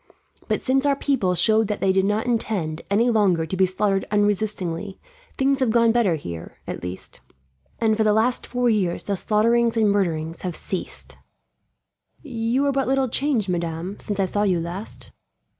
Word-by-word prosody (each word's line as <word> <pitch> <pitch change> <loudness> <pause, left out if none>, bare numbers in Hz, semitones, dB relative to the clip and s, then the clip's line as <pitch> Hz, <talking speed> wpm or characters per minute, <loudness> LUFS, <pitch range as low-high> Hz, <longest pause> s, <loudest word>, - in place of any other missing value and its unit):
But - - -1
since 270 +2 +2
our 280 - +3
people 250 -11 0
showed 215 +5 +4
that 210 -1 -3
they 190 - +2
did 190 0 +2
not 210 +3 0
intend, 205 -9 -1
any 230 +5 +3
longer, 190 -7 +2
to 160 - -4
be 190 0 +3
slaughtered 195 +1 0
unresistingly, 205 -3 -1 0.4
things 275 0 +2
have 260 -3 +2
gone 230 0 +4
better 225 -7 +2
here, 85 - -8
at - - -6
least; 90 +1 -7 0.6
and 220 -1 +2
for 220 - +1
the 215 - +3
last 225 +4 +1
four 245 0 0
years 200 -7 +1
the 200 - -1
slaughterings 230 +4 +2
and 215 -2 +3
murders 165 -5 -1
have 180 -3 -4
ceased. 190 - -4 1.0
"You 245 0 -1
are 280 - +2
but 270 -1 0
little 265 -1 +1
changed, 255 -5 0
madame, 170 +1 -3
since 205 -1 -5
I 195 - +3
saw 205 +2 -1
you 190 -4 +2
last." 175 +6 -7
210 Hz, 175 wpm, -23 LUFS, 185-235 Hz, 1.0 s, showed